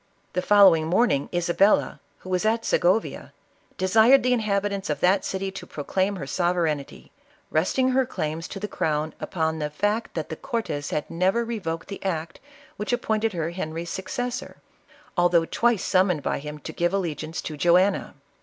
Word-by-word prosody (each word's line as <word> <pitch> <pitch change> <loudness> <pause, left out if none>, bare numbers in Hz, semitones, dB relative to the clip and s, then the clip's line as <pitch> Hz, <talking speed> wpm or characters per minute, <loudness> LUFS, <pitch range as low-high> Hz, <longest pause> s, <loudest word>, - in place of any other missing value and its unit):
The 180 - 0
following 185 -5 +6
morning, 175 - +2
Isabella, 175 +3 +2 0.2
who 185 - -10
was 180 +1 +1
at 225 +1 +1
Sjgo 180 +5 +3
via, - - -9 0.4
desired 220 +8 +5
the 250 0 +3
inhabitants 200 -4 -1
of 150 -2 -1
that 190 +2 +3
city 190 0 -3
to 190 - -9
proclaim 190 +7 -1
her 175 - -5
sovereignty, 165 -2 -1 0.4
resting 220 +11 +2
her 260 0 +2
claims 160 -6 -3
to 195 - -7
the 210 - -3
crown 155 -4 -1
upon 160 -2 -2
the 150 -1 -2
fact 205 +9 -1
that 160 -2 -3
the 160 - -4
cortes 155 -9 -3
had 150 - -2
never 190 +7 +1
revoked 175 -8 -4
the 200 - -8
act 165 -4 -3 0.4
which 210 +3 -3
ap 245 0 0
pointed 220 -1 0
her 165 -1 -2
Henry's 170 -1 -5
successor, 245 +7 -4 0.6
although 175 -2 +3
twice 235 +3 +1
summoned 185 -5 +2
by - - -1
him 150 +1 -7
to 150 - -8
give 175 +2 0
allegiance 160 -4 -3
to 155 - -5
Joanna. 180 +6 +2
185 Hz, 170 wpm, -25 LUFS, 160-210 Hz, 0.6 s, following